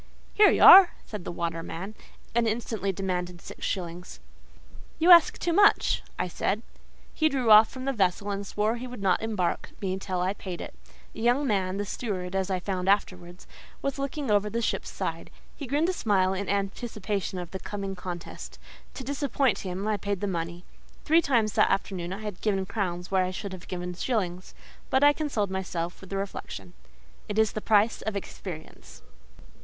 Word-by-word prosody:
—"Here 420 -1 +7
you - - +3
are!" 380 -2 +10
said 210 -5 -7
the - - -4
waterman, 170 +3 -4 0.4
and 235 0 +2
instantly 220 -3 -1
demanded 180 -2 -3
six - - -11
shillings. 180 -1 -4 0.8
"You 340 +3 +5
ask 340 -2 +8
too 340 - -1
much," 410 +3 +4 0.2
I - - -1
said. 200 +5 -2 0.5
He 315 0 +2
drew 255 -6 +1
off 215 +1 +9
from 260 0 -8
the 275 - 0
vessel 200 -1 0
and 200 0 -4
swore 215 +4 0
he 250 +2 -6
would 245 -5 -8
not 185 -2 +2
embark 210 -6 -1
me 190 -2 -2
till 185 -2 -3
I 185 +2 0
paid 185 -3 -7
it. - - -7 0.4
A - - -10
young 245 +5 +2
man, 195 -5 0
the 205 - -2
steward 190 -4 -4
as 190 0 0
I 185 -1 0
found 185 0 -2
afterwards, 180 -3 -1 0.4
was 275 0 -2
looking 275 -2 -2
over 205 0 +3
the 230 - -2
ship's - - -2
side; - - -4 0.3
he 285 - -7
grinned 295 +6 +1
a - - 0
smile 190 - +2
in 195 +1 -3
anticipation 200 -1 -2
of 175 -2 -6
the 190 - -5
coming 195 -1 -5
contest; 180 -2 -8 0.4
to 265 - -6
disappoint 275 -1 0
him, 190 +2 -4
I 215 -1 +1
paid 200 0 -3
the 205 - -2
money. 170 -2 -4 0.4
Three 325 +2 +5
times 230 - +1
that - - +4
afternoon 185 -3 -2
I 195 +3 -5
had 210 -4 -6
given 195 -3 0
crowns 185 -3 -3
where 190 -1 +3
I 180 - -1
should 190 +1 -6
have 185 - -10
given 180 0 -4
shillings; 185 -3 -3 0.3
but 265 +1 +3
I 290 0 +7
consoled 260 -11 -2
myself 175 -2 -4
with 190 - -12
the 195 - -3
reflection, 100 - -6 0.6
"It 210 - -3
is 220 -1 +3
the 215 - -5
price 215 +1 +3
of 220 -1 -3
experience." 180 -4 -8
200 Hz, 190 wpm, -27 LUFS, 185-225 Hz, 0.8 s, are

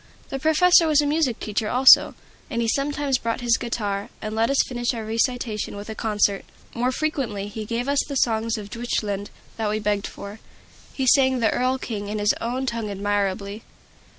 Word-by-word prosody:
The 270 - -4
professor 325 +3 +5
was 305 -2 +4
a - - -1
music 290 -5 0
teacher 215 0 -2
also, 255 +1 +6 0.3
and 235 - -2
he 230 - 0
sometimes 280 +1 0
brought 230 +2 -2
his 240 -1 +3
guitar, 205 -4 -3
and 215 -1 -5
let 225 +1 +1
us 275 - +1
finish 240 0 -2
our 225 -1 -5
recitation 225 -1 -1
with 205 +2 -8
a - - -4
concert. 210 -2 0 0.3
More 245 +2 0
frequently 255 -9 -2
he 215 +1 -6
gave 235 +3 -3
us 280 0 +2
the 280 - -5
songs 230 -2 +1
of 205 -1 -8
Deutschland 210 -4 -3 0.3
that 220 -2 -1
we 210 - 0
begged 210 -1 -1
for. 200 +2 -9 0.5
He 265 - -2
sang 260 0 +4
the 225 -3 +2
"Erl 255 +1 +1
King" 210 -5 -5
in 210 +1 -3
his 210 0 +2
own 250 +3 -2
tongue 230 -4 -3
admirably. 200 +1 -2
230 Hz, 190 wpm, -23 LUFS, 210-260 Hz, 0.5 s, also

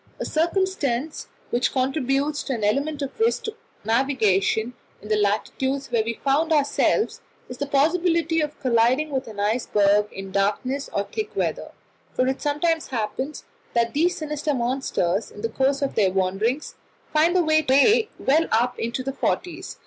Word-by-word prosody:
A - - -3
circumstance 320 -5 -1 0.2
which 245 +1 +1
contributes 275 +2 0
an 235 -5 -2
element 285 +7 0
of 275 +9 -7
risk 455 +1 +2
to 445 -1 -5 0.3
navigation 225 -2 +1 0.3
in 210 - -12
the 215 - +3
latitudes 240 +7 -1
where 230 -2 +2
we 230 +1 -3
found 295 +4 +2
ourselves 305 +8 +2 0.3
is 250 - -9
the 285 - -2
possibility 330 +3 +2
of 300 0 -4
colliding 255 +4 +2
with 265 -2 -2
an 215 -2 -9
iceberg 210 -1 +2
in 195 0 -8
darkness 210 +8 -1
or 200 - 0
thick 430 - -5
weather; - - -2 0.4
for 255 - +2
it 265 +1 -1
sometimes 315 +3 0
happens 260 +4 -3 0.3
that 235 -1 +2
these 340 +5 +1
sinister 300 -1 -2
monsters 235 -6 -1
in 205 - -11
the 230 - 0
course 270 +4 +1
of 275 - -1
their 205 -4 +3
wanderings 195 +9 -1 0.4
find 320 +4 +3
their 360 - +4
way 310 - +4
well 310 +5 +2
up 240 +3 +1
into 235 +3 -2
the 270 +1 -3
"forties." 355 +5 -3
270 Hz, 155 wpm, -24 LUFS, 230-310 Hz, 0.4 s, their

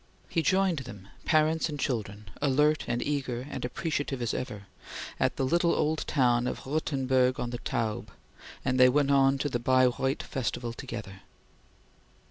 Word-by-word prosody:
He 165 - 0
joined 185 -2 +2
them, 105 -7 -10 0.2
parents 155 +1 +2
and 145 -1 -5
children, 105 -6 -3
alert 150 +2 +3
and 120 0 -1
eager 130 -4 -2
and 135 -3 -5
appreciative 140 +1 -2
as 120 -1 -1
ever, 105 -6 -5 0.5
at - - +1
the 135 - 0
little 170 +5 +2
old 155 +1 0
town 125 -3 +2
of - - -4
Rothenburg 130 -3 +1
on 120 - -2
the 120 - -4
Taube, 110 -3 -2 0.6
and 130 -1 +1
they 125 0 +8
went 140 +1 +2
on 135 0 +4
to 140 - -1
the 125 -4 -1
Baireuth 130 +2 +2
festival 120 -2 -3
together. 100 -6 -7
130 Hz, 155 wpm, -29 LUFS, 120-145 Hz, 0.6 s, they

